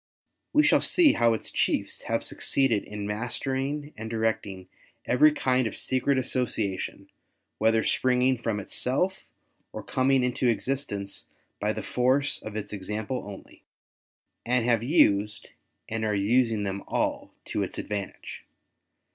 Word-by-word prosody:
We 300 0 +5
shall 300 - +4
see 340 -5 +5
how 115 -1 +3
its - - -4
chiefs - - 0
have - - 0
succeeded 130 -7 +1
in 105 -1 -6
mastering 135 +7 -3
and 110 +1 -6
directing 110 -4 -2 0.4
every 150 +5 +5
kind 130 -4 +1
of - - -6
secret 130 +1 +1
association 110 -7 -2 0.5
whether 110 +1 +3
springing 130 0 +2
from 115 -3 -2
itself 135 - -1 0.5
or - - -7
coming 130 0 +2
into 125 0 0
existence 115 -4 -2 0.3
by - - 0
the - - -5
force 130 +3 +1
of 110 -1 -8
its 105 -1 -5
example 105 +5 -4
only; 100 - -12 0.8
and 120 0 +1
have 120 -2 +3
used, 105 -7 +2 0.4
and 110 0 -3
are 105 -1 0
using 110 +1 +2
them 100 0 -3
all - - -1
to - - -2
its - - -4
advantage. 100 -2 -5
115 Hz, 135 wpm, -27 LUFS, 105-130 Hz, 0.8 s, We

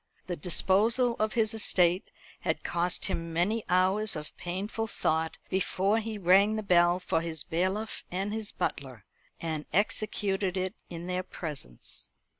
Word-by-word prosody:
The 180 - -3
disposal 215 - +2
of 215 0 +1
his 225 -1 +2
estate 185 -4 +3 0.3
had - - -1
cost 175 0 0
him 165 0 -2
many 200 +7 +1
hours 190 +4 +3
of 150 -1 -7
painful 200 +5 -3
thought 160 -6 0
before 195 +2 +1
he 220 -1 -4
rang 195 +3 +5
the 215 - -2
bell 175 -2 +4
for 165 -3 0
his 165 -2 -4
bailiff 190 +6 -2
and 195 +3 -2
his 220 -1 -3
butler, 130 -7 -4 0.3
and 160 -2 -3
executed 200 -2 0
it 185 +1 -1 0.2
in 170 0 -6
their 180 0 -1
presence. 150 - -8
185 Hz, 145 wpm, -29 LUFS, 170-210 Hz, 0.3 s, rang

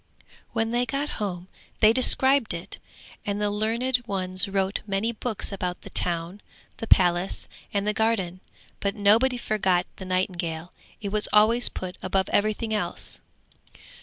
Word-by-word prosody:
When 225 0 -1
they 245 +1 0
got 280 +2 -2
home 180 -3 -4 0.3
they 220 0 +6
described 260 -3 +5
it, 170 +2 -7 0.4
and 205 0 -3
the 210 0 0
learned 230 +5 0
ones 185 0 +1
wrote 195 0 -1
many 200 +3 0
books 225 -2 -4
about 180 -2 -4
the - - -11
town, 175 +3 -1 0.4
the 225 - -6
palace 175 -1 +2 0.2
and 200 0 -1
the 210 - +1
garden; 205 -5 0 0.4
but 200 +1 -1
nobody 225 +5 +4
forgot 190 -6 +1
the 190 - -8
nightingale, 175 -3 -2 0.3
it 200 - -3
was 210 +1 +1
always 225 +3 +5
put 185 -1 -7
above 190 +1 0
everything 215 +2 0
else. 210 - -1
205 Hz, 145 wpm, -25 LUFS, 185-225 Hz, 0.4 s, they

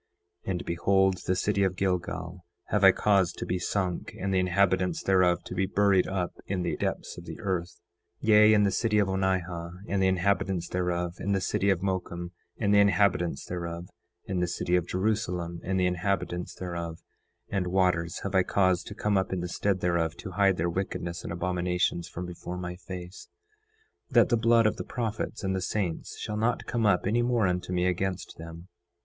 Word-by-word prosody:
9:6 - - -2
And 90 - -3
behold, 95 +2 +2
the 95 - +2
city 100 +2 0
of 95 -1 +1
Gilgal 90 -1 -2 0.3
have 105 -2 +1
I 95 - +10
caused 100 -3 +2
to - - -4
be 90 - -1
sunk, 90 0 -2
and 95 +1 -1
the 95 - +3
inhabitants 90 -1 +1
thereof 90 -2 +3
to - - -7
be 95 +1 0
buried 100 -2 +3
up 95 -2 -2
in 95 -2 -1
the 85 - -1
depths - - -3
of - - -12
the - - -8
earth; 90 -3 -3 0.4
9:7 - - -4
Yea, 105 0 +7
and 105 -1 +4
the 100 - +2
city 110 0 +1
of 105 -2 +3
Onihah 90 -3 -1
and 100 0 0
the 95 - +4
inhabitants 95 -1 +1
thereof, 90 -1 -1
and 100 +1 0
the - - +1
city 95 +2 0
of 95 -2 +1
Mocum 90 -2 -3 0.3
and 105 -2 +1
the 100 - +6
inhabitants 100 -3 +2
thereof, 85 0 -5 0.4
and 95 -2 -1
the 90 - +1
city 85 0 0
of 90 -1 +1
Jerusalem 90 -4 -1
and 95 0 0
the 90 - +3
inhabitants 90 0 -1
thereof; 85 -2 -5 0.5
and 95 -3 -1
waters 90 -3 +1
have 100 - -3
I 95 - +5
caused 95 -1 +1
to 100 - -7
come 105 -2 +1
up 95 - -2
in 95 -2 -1
the 90 - -3
stead 95 +1 0
thereof, 85 -2 0
to 95 - -7
hide 95 0 +3
their 85 - 0
wickedness 85 -1 -3
and - - -5
abominations 90 0 -1
from 90 +1 -6
before 90 0 -6
my 90 0 -5
face, 90 0 -9 0.8
that - - +5
the 120 - +4
blood 115 0 +4
of 110 - +2
the - - -4
prophets 115 -2 -4
and 95 0 0
the 95 - -1
saints 90 -3 -3
shall 105 - -4
not 115 +3 0
come 115 -2 0
up 90 -3 +3
any 110 +5 +2
more 120 -3 +2
unto 90 0 -1
me 90 0 +1
against 90 -1 -2
them. 85 +2 -9
90 Hz, 200 wpm, -28 LUFS, 90-100 Hz, 0.8 s, I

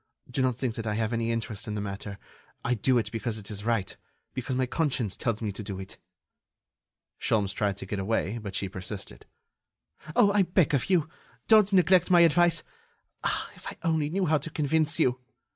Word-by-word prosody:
Do 135 - 0
not 130 -2 +2
think 130 -3 -1
that 110 0 -5
I 105 - 0
have 110 +1 -1
any 115 0 0
interest 115 -2 -3
in 105 - -3
the - - -2
matter. 100 0 -5 0.5
I 120 - +2
do 125 +2 +2
it 110 -3 -1
because 115 -1 -3
it 105 0 -9
is 105 -1 -6
right... 115 -4 0 0.4
because 130 0 -3
my 130 0 +2
conscience 130 - -1
tells 115 -2 -2
me 105 - -1
to 100 - -7
do 95 -2 -5
it." 95 0 -9 1.2
Sholmes 105 -2 +1
tried 100 -1 0
to 95 - -6
get 100 +1 -3
away, 105 +2 -1
but 100 -3 -6
she 100 - -1
persisted: 95 +1 -7 0.9
"Oh! 200 - +6
I 205 0 +4
beg 175 -4 +2
of 140 +3 +1
you, 175 -5 +3 0.4
don't 215 -2 +6
neglect 180 -1 +5
my 175 -2 +7
advice.... 170 0 +4 0.6
Ah! - - -1
if - - -11
I - - -6
only 160 -3 +1
knew 190 +3 0
how 155 -2 +3
to 155 - -6
convince 155 +1 +1
you! 125 -5 +2
120 Hz, 200 wpm, -28 LUFS, 105-160 Hz, 1.2 s, my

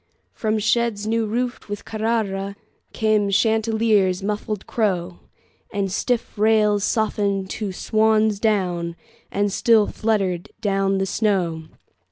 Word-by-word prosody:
From 215 - -1
sheds 215 0 +1
new 225 0 0
roofed 240 +1 -3
with 205 0 -5
CarraraCame 215 -1 -2
Chanticleer's 220 -3 +2
muffled 210 0 -3
crow, 180 -6 -1 0.5
The 200 -2 -1
stiff 230 +3 -2
rails 210 -1 +3
softened 200 -3 0
to 210 -3 -3
swan's 215 +1 +2
down, 180 -6 0 0.4
And 205 0 0
still 225 -1 +4
fluttered 195 -7 -1
down 195 -2 +1
the 190 - 0
snow. 180 -6 0
210 Hz, 110 wpm, -22 LUFS, 195-220 Hz, 0.5 s, still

